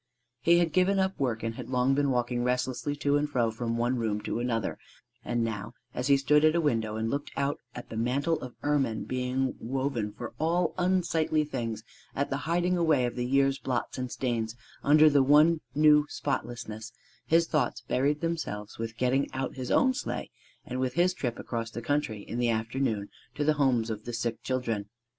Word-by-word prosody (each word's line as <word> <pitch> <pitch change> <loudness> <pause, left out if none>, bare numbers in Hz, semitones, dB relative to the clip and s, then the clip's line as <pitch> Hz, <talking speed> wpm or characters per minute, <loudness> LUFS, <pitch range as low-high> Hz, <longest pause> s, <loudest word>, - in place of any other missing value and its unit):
He 170 +7 +5
had 170 -2 +2
given 185 +2 +3
up 190 0 0
work 120 -5 -1
and 115 0 -2
had 120 0 -8
long 125 +1 +2
been 140 0 +2
walking 120 -1 0
restlessly 125 +3 -1
to 145 0 +2
and 145 0 -1
fro 120 -5 +1
from 115 +1 -2
one 120 +2 +1
room 110 -3 -1
to 110 - -3
another; 120 -2 -1 0.4
and 120 -1 0
now 115 +1 -4 0.2
as 125 +1 -2
he 140 -1 +6
stood 150 +2 +3
at 155 +1 +5
a - - +3
window 115 -8 0
and 110 0 -1
looked 140 +1 -2
out 140 +1 0 0.2
at 120 - -8
the - - -7
mantle 140 +8 0
of 125 -1 -8
ermine 135 -7 +1
being 130 +1 -1
woven 125 -3 -2
for 115 +2 -7
all 165 +1 +1
unsightly 170 -4 +2
things, 115 -6 -4 0.3
at 140 - -1
the 135 - 0
hiding 175 +1 +2
away 155 -7 +3
of 120 - -3
the 125 0 -2
year's 135 +1 +2
blots 130 0 -2
and 125 -1 -3
stains 115 -3 -2 0.3
under 155 +2 +7
the 145 -2 +5
one 150 +4 +5
new 150 0 +5
spotlessness, 115 -5 -4 0.4
his 165 +1 +4
thoughts 150 -6 0
buried 145 +3 0
themselves 155 -13 -3
with 115 0 -4
getting 130 +3 +1
out 130 -1 -2
his 130 -2 -5
own 260 0 +4
sleigh 280 - -4 0.3
and 125 +1 -4
with 130 -1 -1
his 180 +2 +3
trip 120 -9 -3
across 115 -1 -4
country 120 -2 -2
in 120 - -5
the 120 -1 +2
afternoon 115 -1 -1 0.3
to 145 - -1
the 155 +1 +4
homes 125 -6 +2
of 110 0 -6
the 120 - -5
sick 115 -1 -2
children. 120 -5 -2
130 Hz, 195 wpm, -29 LUFS, 115-150 Hz, 0.4 s, under